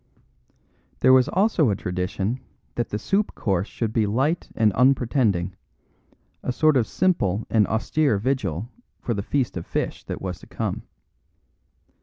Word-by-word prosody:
There 130 - +6
was 130 -1 +5
also 190 - +3
a 100 - +1
tradition 95 +6 -2 0.3
that 120 - -2
the 105 - -2
soup 195 - 0
course 95 -2 0
should 110 -2 -3
be 110 -3 +2
light 135 +11 0
and 110 -3 +3
unpretending 120 -8 +2 0.9
a - - -2
sort 155 +4 +3
of 120 -4 +2
simple 115 - +1
and 110 -3 +4
austere 125 +3 +1
vigil 105 - -1 0.3
for 120 - -2
the 100 - -2
feast 130 +4 -1
of 85 - -5
fish - - -3
that - - -5
was 90 -2 -5
to - - -15
come. - - -3
115 Hz, 150 wpm, -24 LUFS, 100-135 Hz, 0.9 s, There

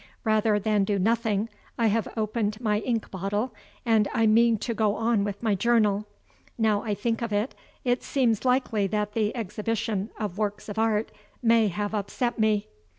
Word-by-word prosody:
Rather 215 -2 +3
than 210 0 +1
do 200 +1 0
nothing, 220 +1 +1 0.3
I 230 - +2
have 220 -1 +2
opened 215 -1 -1
my 210 -3 +1
ink 230 0 -2
bottle, 200 +6 -2 0.3
and 220 -3 +3
I 225 -2 +3
mean 225 +1 +5
to 230 +3 -3
go 215 -2 +1
on 225 -2 +1
with 205 +1 -4
my 220 -2 +2
journal. 210 -1 +2 0.5
Now 215 -3 +2
I 210 -2 -2
think 225 +3 -1
of 230 -2 -2
it, 210 +5 0 0.3
it 245 0 +1
seems 240 -6 +1
likely 250 -5 +2
that 210 +1 -2
the 215 +1 0
exhibition 210 -1 -2
of 210 -2 -4
works 210 -1 -2
of 205 - -4
art 220 -1 +1 0.3
may 230 -1 +5
have 205 +3 -3
upset 220 +4 -2
me. 215 -1 +2
215 Hz, 175 wpm, -26 LUFS, 205-230 Hz, 0.5 s, mean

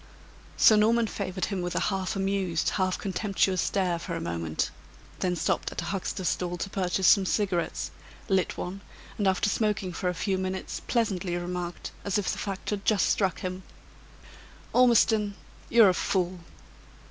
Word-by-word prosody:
Sir 215 - +7
Norman 230 +2 +4
favored 185 -3 -3
him 195 -3 -3
with 175 0 -3
a - - +2
half 190 +1 -2
amused, 195 -4 0
half 185 -2 0
contemptuous 195 -1 0
stare 180 -4 0
for 170 0 -5
a - - -3
moment; 85 - -2 0.5
then 180 -1 0
stopped - - -1
at - - -4
a - - -5
huckster's 185 0 -3
stall 175 -1 -2
to 195 +3 -4
purchase 190 0 0
some 200 - +6
cigarettes; 185 -3 -1 0.4
lit 190 -3 +1
one, 190 +3 -5 0.4
and 205 - +2
after 190 +1 +2
smoking 205 -3 0
for 180 +2 -1
a 180 - -3
few 190 +2 -1
minutes, 185 0 -3
pleasantly 195 -7 0
remarked, 175 0 -4
as 200 -1 0
if 205 - -1
the - - -4
fact 195 0 -4
had 200 -1 -2
just 210 -2 +3
struck 190 -5 +1
him: 185 0 -4 1.1
"Ormiston, 220 -4 +4 0.3
you're 225 -4 +7
a - - +3
fool!" 180 0 -1
190 Hz, 165 wpm, -27 LUFS, 180-200 Hz, 1.1 s, Sir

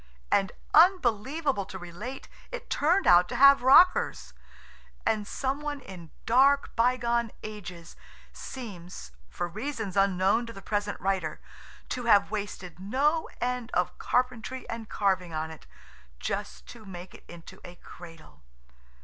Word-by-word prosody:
And, 195 -1 +2 0.2
unbelievable 280 - +3
to 190 - -8
relate, 190 +9 -8 0.2
it - - -8
turned 350 +7 +2
out 175 0 +6
to - - -4
have 275 0 +7
rockers, 280 +8 +4 0.7
and 210 -2 0
some 270 +1 -2
one 295 -1 -4
in 180 -9 -11 0.2
dark, 275 +4 +3
bygone 235 -1 +1
ages 180 -6 -9 0.4
seems, 180 - -9 0.2
for 175 - -3
reasons 215 +1 -5
unknown 195 +4 +2
to 230 - -8
the 195 - -10
present 205 0 -2
writer, 190 -5 -2 0.5
to 245 -1 -4
have 205 -3 +4
wasted 200 -5 -5
no 275 - 0
end 245 -1 -2
of 180 0 0
carpentry 250 0 -1
and 225 -1 -6
carving 185 -4 0
on 160 +1 -3
it, 160 - -13 0.5
just - - -5
to - - -11
make 185 -2 -10
it - - -15
into 170 -1 -13
a 175 - -10
Cradle. 165 - -14
215 Hz, 135 wpm, -28 LUFS, 180-255 Hz, 0.7 s, have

